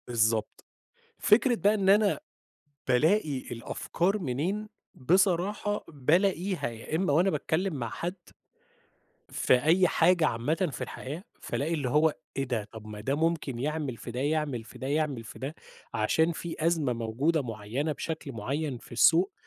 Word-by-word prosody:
بالضبط. 110 Hz, -2 st, 0 dB, 0.5 s
فكرة 240 Hz, +4 st, +4 dB
بقى 205 Hz, -1 st, +3 dB
إن 195 Hz, -3 st, +1 dB
أنا 205 Hz, +3 st, +4 dB, 0.7 s
بالاقي 150 Hz, +4 st, +3 dB
الأفكار 175 Hz, -, -1 dB
منين، 180 Hz, +8 st, -2 dB, 0.3 s
بصراحة 190 Hz, +6 st, +1 dB
بالاقيها 175 Hz, +5 st, +1 dB
يا 115 Hz, +6 st, -5 dB
إمّا 165 Hz, -3 st, +1 dB
وأنا 175 Hz, +6 st, +4 dB
باتكلّم 185 Hz, 0 st, -1 dB
مع 120 Hz, -4 st, -3 dB
حد 175 Hz, -, -4 dB, 1.1 s
في -, -, +2 dB
أي 175 Hz, +4 st, +4 dB
حاجة 175 Hz, -2 st, +4 dB
عامةً 155 Hz, +10 st, 0 dB
في -, -, -4 dB
الحياة، 150 Hz, +7 st, -7 dB, 0.2 s
فالاقي 160 Hz, +4 st, -2 dB
اللي 140 Hz, -5 st, -1 dB
هو 150 Hz, +3 st, +3 dB, 0.2 s
إيه 135 Hz, -, 0 dB
ده! 120 Hz, -5 st, -2 dB
طب 110 Hz, -2 st, -10 dB
ما 105 Hz, -1 st, -8 dB
ده 135 Hz, +6 st, -1 dB
ممكن 155 Hz, -5 st, 0 dB
يعمل 145 Hz, -1 st, -2 dB
في 115 Hz, -, -8 dB
ده، 125 Hz, +2 st, -4 dB
يعمل 145 Hz, -5 st, -1 dB
في -, -, -13 dB
ده، 130 Hz, -, -5 dB
يعمل 145 Hz, -4 st, -1 dB
في -, -, -10 dB
ده، 135 Hz, +4 st, -5 dB, 0.4 s
عشان 160 Hz, +10 st, +2 dB
في 170 Hz, 0 st, -6 dB
أزمة 160 Hz, -6 st, +2 dB
موجودة 120 Hz, +8 st, 0 dB
معيّنة 115 Hz, +6 st, -3 dB
بشكل 155 Hz, -2 st, -5 dB
معيّن 135 Hz, +5 st, -3 dB
في -, -, -16 dB
السوق، 170 Hz, -, +5 dB
150 Hz, 150 wpm, -28 LUFS, 125-175 Hz, 1.1 s, السوق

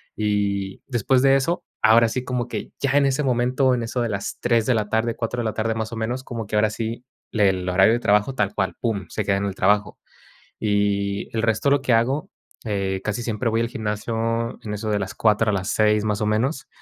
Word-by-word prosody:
Y, 100 Hz, -2 st, -1 dB
después 130 Hz, +1 st, +2 dB
de 135 Hz, 0 st, +6 dB
eso, 165 Hz, +6 st, -1 dB, 0.2 s
ahora 115 Hz, +1 st, +6 dB
sí, 125 Hz, +2 st, -3 dB
como 125 Hz, -1 st, -2 dB
que -, -, -6 dB
ya 140 Hz, -, 0 dB
en 140 Hz, -1 st, +4 dB
ese 135 Hz, +2 st, 0 dB
momento, 125 Hz, +1 st, +2 dB
en 120 Hz, -, 0 dB
eso 120 Hz, +2 st, -3 dB
de 115 Hz, -, 0 dB
las 100 Hz, -1 st, -4 dB
3 115 Hz, -2 st, +2 dB
de 125 Hz, -, +3 dB
la 105 Hz, -1 st, -1 dB
tarde, 110 Hz, +1 st, 0 dB
4 120 Hz, +1 st, -3 dB
de -, -, -4 dB
la 110 Hz, -, -1 dB
tarde, 115 Hz, 0 st, 0 dB
más 110 Hz, 0 st, -3 dB
o -, -, -3 dB
menos, 120 Hz, +4 st, -3 dB
como 115 Hz, -4 st, -5 dB
que, 105 Hz, -, -3 dB
ahora 105 Hz, 0 st, +3 dB
sí, 115 Hz, +2 st, -4 dB, 0.3 s
le 105 Hz, -3 st, +3 dB
el 90 Hz, -1 st, -2 dB
horario 95 Hz, +5 st, +5 dB
de 120 Hz, -, +1 dB
trabajo 105 Hz, +4 st, +2 dB
tal 100 Hz, -4 st, 0 dB
cual, 95 Hz, -, -1 dB
"Pum", 105 Hz, -6 st, -2 dB
se 110 Hz, -, -3 dB
queda 100 Hz, -1 st, +2 dB
en 100 Hz, -, -2 dB
el 95 Hz, -1 st, -3 dB
trabajo, 100 Hz, +1 st, +1 dB, 0.6 s
y, 100 Hz, -1 st, 0 dB
el 110 Hz, -, +1 dB
resto 110 Hz, +5 st, +2 dB
lo 140 Hz, -1 st, +3 dB
que 130 Hz, -, -1 dB
hago, 130 Hz, +6 st, +1 dB, 0.4 s
eh, 95 Hz, -2 st, -1 dB
casi 110 Hz, +3 st, -2 dB
siempre 115 Hz, +1 st, -2 dB
voy 115 Hz, +1 st, +1 dB
al 115 Hz, -, 0 dB
gimnasio 115 Hz, +1 st, -2 dB
en 105 Hz, -1 st, -4 dB
eso 105 Hz, +1 st, -4 dB
de 105 Hz, -, +1 dB
las 95 Hz, -1 st, -4 dB
4, 110 Hz, 0 st, +2 dB
a -, -, -2 dB
las 95 Hz, -1 st, -2 dB
6 105 Hz, 0 st, +2 dB
más 105 Hz, -1 st, -1 dB
o -, -, +1 dB
menos, 125 Hz, +7 st, 0 dB
110 Hz, 240 wpm, -23 LUFS, 105-120 Hz, 0.6 s, de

